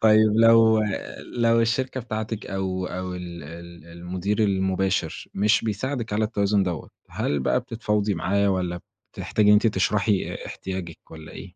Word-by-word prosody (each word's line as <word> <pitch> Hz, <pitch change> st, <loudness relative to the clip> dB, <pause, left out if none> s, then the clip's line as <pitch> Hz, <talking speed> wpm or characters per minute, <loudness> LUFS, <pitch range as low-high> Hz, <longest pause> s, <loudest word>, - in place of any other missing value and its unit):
طيب، 110 Hz, 0 st, +6 dB
لو 115 Hz, -1 st, +6 dB, 0.6 s
لو 115 Hz, -1 st, +3 dB
الشركة 130 Hz, +3 st, 0 dB
بتاعتك 110 Hz, -2 st, -4 dB
أو 95 Hz, -1 st, -2 dB
أو 90 Hz, 0 st, -5 dB
ال 85 Hz, -1 st, -7 dB
ال 85 Hz, +1 st, -11 dB
المدير 90 Hz, +5 st, -3 dB
المباشر 95 Hz, -1 st, 0 dB
مش 105 Hz, +3 st, +2 dB
بيساعدك 115 Hz, +2 st, -3 dB
على 110 Hz, +1 st, +1 dB
التوازن 100 Hz, -2 st, +1 dB
دَوّة، 90 Hz, -4 st, -3 dB, 0.2 s
هل 75 Hz, -, -1 dB
بقى -, -, +1 dB
بتتفاوضي 105 Hz, -2 st, -1 dB
معاه، 100 Hz, +4 st, +1 dB
والّا 90 Hz, -2 st, -2 dB, 0.3 s
بتحتاجي 105 Hz, -1 st, 0 dB
إن -, -, +8 dB
أنتِ 105 Hz, +2 st, +5 dB
تشرحي 100 Hz, -1 st, +1 dB
احتياجِك، 95 Hz, -3 st, -6 dB
والّا 80 Hz, -1 st, -11 dB
إيه؟ -, -, -8 dB
100 Hz, 145 wpm, -24 LUFS, 90-110 Hz, 0.6 s, إن